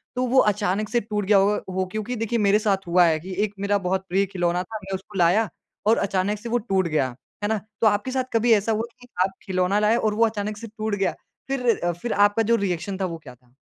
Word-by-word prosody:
तो 255 - 0
वो 260 +2 +4
अचानक 205 +1 -1
से 240 - +2
टूट 210 -1 -3
गया 205 0 +5
होगा 200 +2 +3
हो? 185 0 -1
क्योंकि 215 +3 -3
देखिए 225 +1 -1
मेरे 205 0 +4
साथ 195 -4 0
हुआ 175 0 +5
है 160 -1 +2
कि 185 +4 -7
एक 205 -1 -2
मेरा 200 0 +1
बहुत 190 +1 -1
प्रिय 195 +2 +2
खिलौना 180 -2 -1
था, 220 +1 -7
मैं 195 0 -6
उसको 195 +1 -9
लाया 180 +6 +3 0.4
और 225 - +5
अचानक 195 +2 -1
से 235 +1 -7
वो 240 - +2
टूट 195 -5 0
गया, 150 -4 +1 0.4
है - - +2
ना? 220 - +1 0.2
तो 220 - +5
आपके 210 +5 +1
साथ 260 -1 0
कभी 230 +1 +3
ऐसा 215 +1 +2
हुआ 220 +1 0 0.2
कि 245 - -14 0.2
आप 190 - -1
खिलौना 185 +2 +1
लाए 210 +2 +3
और 215 -3 +1
वो 230 +2 +4
अचानक 210 -1 -3
से 230 +1 -8
टूट 215 -1 -3
गया? 195 -2 0 0.3
फिर, 245 -10 +1
फिर 240 - -2
आपका 205 +2 +3
जो 230 +2 +3
रिएक्शन 180 +2 -3
था, - - +1
वो 165 -2 -4
क्या 125 -2 -10
था? 125 0 -31
205 Hz, 250 wpm, -24 LUFS, 185-220 Hz, 0.4 s, गया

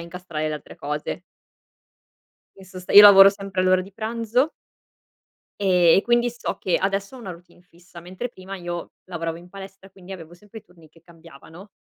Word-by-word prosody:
a - - -7
incastrare 170 -3 -6
le 155 - -3
altre 150 - -11
cose. 150 +4 -6 1.3
In 195 - -16
sost 185 -1 -11
io 205 - +10
lavoro 195 -1 +9
sempre 195 -2 -5
all'ora 185 0 +3
di 195 +1 -14
pranzo 230 +6 -2 1.1
e 180 -4 +4
e 195 - +2
quindi 240 0 +1
so 240 - -6
che 180 - 0
adesso 195 +5 -3
ho - - -12
una 200 -6 -8
routine 175 +1 -15
fissa, 175 0 -17
mentre 185 +8 -7
prima 195 -4 -10
io 175 -1 -7
lavoravo 165 -2 -5
in 175 +1 -16
palestra 195 0 -12
quindi 190 0 -13
avevo 170 -2 -11
sempre 210 +5 -14
i - - -17
turni 170 -3 -21
che 165 +2 -24
cambiavano. 165 +3 -16
185 Hz, 180 wpm, -22 LUFS, 170-195 Hz, 1.3 s, io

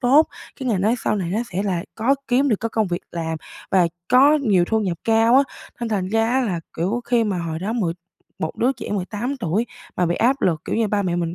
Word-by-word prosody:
tốt, 275 +5 +5 0.3
cái 260 - -2
ngành 200 -6 +1
nói 220 +5 +3
sau - - +2
này 175 -3 -2
nó 210 - 0
sẽ 190 +3 0
là 185 -3 -1
có 240 +5 +2
kiếm 265 +3 +3
được 220 - +3
cái 230 - -1
công 220 -1 0
việc 175 -1 -2
làm 165 -1 -2 0.3
và 185 -3 +4 0.2
có 275 +4 +6
nhiều 190 -7 +3
thu 220 +3 +1
nhập 180 -5 -2
cao 225 +1 +4
á, 275 - +7 0.4
nên 235 - -2
thành 190 -4 -1
ra 225 +1 +2
á 260 +2 +2
là, 185 -9 -1 0.2
kiểu, 195 +9 0
khi 240 -2 +2
mà 195 -4 -1
hồi 165 -1 -3
đó 200 +5 -2
mười 190 -9 0 0.5
một 160 - -3
đứa 255 +3 +2
trẻ - - -8
18 210 +7 -2
tuổi 220 +1 -1 0.3
mà 180 - +2
bị 170 - +1
áp 265 +4 +2
lực, 160 -4 +2
kiểu - - -2
như, 225 -2 +1
ba 205 0 +1
mẹ 175 -2 -1
mình 170 0 -2
210 Hz, 255 wpm, -22 LUFS, 180-240 Hz, 0.5 s, á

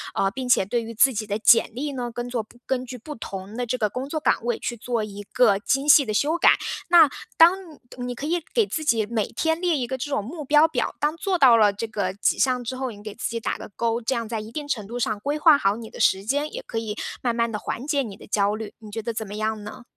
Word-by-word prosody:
呃， 195 - +2
并 255 +2 -5
且 235 - +4
对 235 +4 -1
于 230 0 -7
自 265 +4 +4
己 215 -1 -3
的 205 0 -1
简 230 +1 +5
历 285 +5 -3
呢， 245 -2 -3
跟 240 +1 -4
做 235 -3 -2 0.2
根 255 -1 -1
据 250 0 -8
不 300 +6 -8
同 195 -2 -7
的 245 - -1
这 245 +2 -2
个 215 -3 0
工 255 +6 -5
作 315 - -2
岗 300 - +1
位 240 -1 -1
去 240 - -3
做 235 0 -2
一 205 -1 -7
个 235 -6 +4
精 270 +6 0
细 290 -1 +7
的 215 - -3
修 295 +10 +1
改。 - - +6 0.4
那 340 -4 +7 0.3
当 330 +2 +8 0.4
你 245 0 -4
可 275 - -6
以 340 +3 0
给 455 - +3
自 320 -5 -4
己 225 -6 +2
每 220 -1 -1
天 320 0 -1
列 350 -4 +2
一 255 - -1
个 260 +1 -3
这 260 - -5
种 275 -7 -1
目 300 - -7
标 295 +3 +5
表， 290 -7 -2
当 300 +2 0
做 370 +2 -1
到 260 -7 +7
了 210 -2 +5
这 215 +3 -4
个 200 -4 -2
几 195 0 0
项 255 -2 +2
之 250 +2 -4
后， 260 0 -2
你 205 -2 -12
给 215 -1 -7
自 - - -3
己 230 - -3
打 - - -2
个 - - -9
勾。 230 0 0
这 250 +3 -1
样 230 -1 -3
在 225 0 -3
一 215 +1 -8
定 295 +3 -5
程 220 -8 -3
度 235 +3 -6
上 215 -3 -1
规 285 +7 -2
划 305 -1 +6
好 200 -6 +1
你 225 -1 -9
的 - - -12
时 190 +1 +3
间， 285 +6 -1
也 - - -5
可 230 - -5
以 220 -2 -3 0.3
慢 240 -2 0
慢 230 0 +1
地 210 - -2
缓 245 - -5
解 285 -3 +1
你 205 -5 -8
的 - - -14
焦 205 0 +1
虑， 220 -1 -7
你 215 -2 -12
觉 225 - -4
得 230 +1 -4
怎 220 0 -4
么 205 - -7
样 215 0 -2
呢？ 210 +4 -9
240 Hz, 305 characters per minute, -24 LUFS, 215-275 Hz, 0.4 s, 当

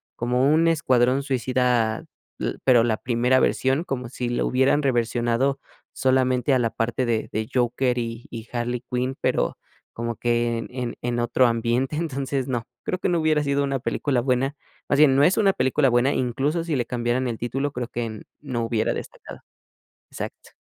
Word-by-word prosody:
Como 125 +4 +1
un 165 +1 +4
escuadrón 130 -4 +2
suicida, 125 -4 0 0.3
u - - -1
pero, 125 -3 +5
la 115 -2 +1
primera 125 +2 +2
versión, 135 +5 +1
como 125 -5 -4
si 125 -1 -4
lo 120 - 0
hubieran 130 +3 +2
reversionado 120 +1 +1 0.3
solamente 130 0 +2
a 130 - +3
la 115 -2 +1
parte 115 +3 -1
de 115 -2 -1
de 110 +1 -2
Joker 125 0 +1
y 115 -1 -4
y 115 0 -8
Harley 120 0 -2
Quinn, 125 +1 -1
pero, - - 0 0.4
como 115 0 -3
que 120 -1 0
en - - -6
en 125 -2 -4
en 120 0 -1
otro 120 +2 +3
ambiente. 120 +4 0
Entonces 140 -4 -2
no, 120 -3 -3 0.2
creo 185 - -2
que - - 0
no 175 -1 +2
hubiera 155 -1 +2
sido 140 0 +1
una 135 -1 -1
película 130 0 0
buena. 130 +3 0 0.3
Más 140 - +2
bien, 145 -3 +6
no 140 - +4
es 180 +6 +4
una 200 -3 +4
película 130 0 +2
buena, 120 +3 +3
incluso, 135 +7 0
si 165 -3 -2
le 125 -3 0
cambiaran 120 +1 -1
el 115 -2 -3
título, 135 +4 -2
creo 125 -2 -4
que 115 -3 -5 0.2
no 130 -5 -3
hubiera 115 -1 0
destacado. - - -8 0.7
Exacto. - - -7
125 Hz, 180 wpm, -24 LUFS, 120-135 Hz, 0.7 s, bien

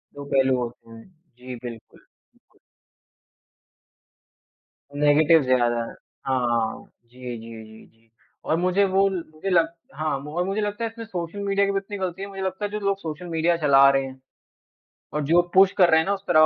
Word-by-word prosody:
दो 145 - -7
पहलू 130 -1 +3
होते 120 -1 -6
हैं। 115 0 -12 0.3
जी 125 0 -8
बिल्कुल। 115 -2 -10 2.9
नेगेटिव 150 +2 +5
ज़्यादा 120 -2 +2
है। - - -9 0.3
हाँ, 130 -1 +1
हाँ, 115 -1 -2 0.2
जी, 125 0 -8
जी, 115 0 -10
जी, 110 0 -15
जी 115 0 -29 0.4
और 160 - +2
मुझे 185 +3 +2
वो 195 +1 +3
ल 180 -3 -4
मुझे 175 +5 -5
लग 170 -3 +4 0.3
हाँ, 155 -2 -1
और 150 +5 -3
मुझे 195 +2 -1
लगता 205 +2 -3
है 225 - -1
फिर 230 +1 -11
इसमें - - -9
सोशल 180 -1 -5
मीडिया 200 0 +2
की 200 - 0
भी 195 - -1
उतनी 200 +1 -5
गलती, 185 0 -4
है 200 - -4
मुझे 195 -1 -7
लगता 190 +2 -3
है 205 - -5
जो 210 - -3
लोग 200 -1 0
सोशल 165 +1 -6
मीडिया 165 +1 +1
चला 140 -3 +6
रहे 135 0 +1
हैं 130 0 -10 0.9
और 150 0 -1
जो 170 +4 +4
पुश 190 0 +6
कर 180 -3 +6
रहे 160 0 +5
हैं 160 - -2
ना 200 - +1
उस 195 - -7
तरह 155 -3 +5
160 Hz, 195 wpm, -24 LUFS, 130-195 Hz, 2.9 s, चला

